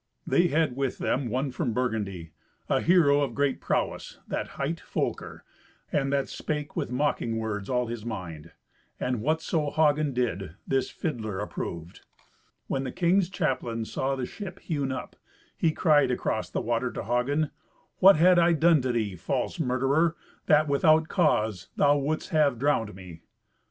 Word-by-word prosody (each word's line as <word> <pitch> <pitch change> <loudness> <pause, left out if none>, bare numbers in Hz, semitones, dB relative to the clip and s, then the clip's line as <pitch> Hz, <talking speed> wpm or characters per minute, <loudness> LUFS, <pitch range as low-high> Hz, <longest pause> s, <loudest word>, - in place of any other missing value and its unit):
They 175 +7 +3
had 155 -4 +1
with 135 -1 -2
them 130 -2 -1
one 130 +4 -1
from 120 -1 -2
Burgundy, 100 -9 -2 0.4
a - - +1
hero 160 -5 +4
of 135 -5 -2
great 140 -2 0
prowess, - - -2
that - - -3
hight 155 +5 -2
Folker, - - -4 0.5
and 135 -1 0
that 140 -1 +1
spake 150 -2 -4
with - - -2
mocking 125 -3 0
words 105 -3 -3
all 125 -1 +1
his 115 -2 -6
mind. 85 -8 -6 0.5
And 125 -3 -1
whatso 155 +1 0
Hagen 150 -1 +2
did, 100 -9 -2
this 135 -1 0
fiddler 110 - -4
approved. 85 -4 -6 0.6
When 135 - -2
the 130 - -4
king's 180 +3 +2
chaplain 130 -10 -2
saw 135 +4 -2
the 130 -2 -3
ship 190 - -8
hewn 145 -5 -2
up, 130 - -6 0.4
he 165 - +2
cried 155 -3 +3
across 125 - -1
the - - -2
water - - -1
to - - -4
Hagen, 130 +7 0 0.5
"What 195 +1 +8
had 175 +3 +5
I 170 0 +4
done 160 -1 +4
to 130 0 0
thee, 110 -5 -1
false 85 - -2
murderer, 135 +6 +1 0.3
that, 150 +1 +5
without 155 +3 +3
cause, 110 - +1
thou 145 0 +4
wouldst 150 +3 -2
have 150 -5 +3
drowned 115 -6 0
me?" 90 -4 -11
135 Hz, 160 wpm, -27 LUFS, 115-155 Hz, 0.6 s, What